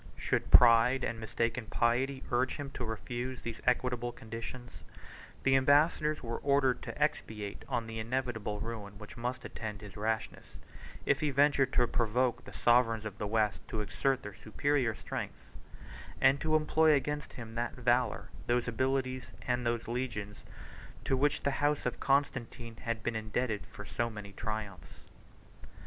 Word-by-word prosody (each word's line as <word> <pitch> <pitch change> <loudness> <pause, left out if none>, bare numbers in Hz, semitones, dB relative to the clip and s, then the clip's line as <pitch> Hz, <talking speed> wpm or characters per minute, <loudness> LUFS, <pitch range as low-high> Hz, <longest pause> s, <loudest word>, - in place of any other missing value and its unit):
Should - - -1
pride 120 +2 +7
and 115 - -2
mistaken 115 +1 -2
piety 130 +4 +1
urge 125 +2 +1
him 140 -2 -6
to 125 - -5
refuse 120 +3 -4
these 115 -1 -5
equitable 125 -1 +1
conditions, 115 +2 -8 0.6
the 135 0 +4
ambassadors 150 +3 +3
were 115 -1 -3
ordered 140 -2 +2
to - - -7
expatiate 105 -2 -2
on 120 -3 -1
the 115 0 -5
inevitable 115 -3 -2
ruin 105 -2 -6
which 105 0 -10
must 125 +2 -4
attend 105 -3 -6
his 105 -2 -10
rashness, 110 +1 -3 0.5
if 140 0 +3
he 150 - +1
ventured 140 -1 +3
to 125 - +4
provoke 120 +2 0
the - - -10
sovereigns 115 -2 +3
of 105 -1 -6
the 105 - -2
West 105 -1 +1
to 110 - -2
exert 130 +6 0
their 105 - -7
superior 120 +2 0
strength; - - -6 0.7
and 135 +1 +4
to 155 0 +2
employ 155 0 +4
against 150 +1 -1
him 115 -2 -8
that 120 +1 -2
valor, 125 0 +1 0.2
those 120 0 +1
abilities, 130 +2 -1
and 125 -1 0
those 115 -1 -1
legions, 115 -4 -3 0.7
to 135 - +2
which 145 +2 +1
the 140 - +2
house 145 0 +2
of - - -2
Constantine 125 -4 0
had 115 -2 -3
been 120 - -1
indebted 110 0 -2
for 100 - -10
so 115 +2 -1
many 105 -2 -8
triumphs. 110 -5 -6
120 Hz, 155 wpm, -32 LUFS, 110-130 Hz, 0.7 s, pride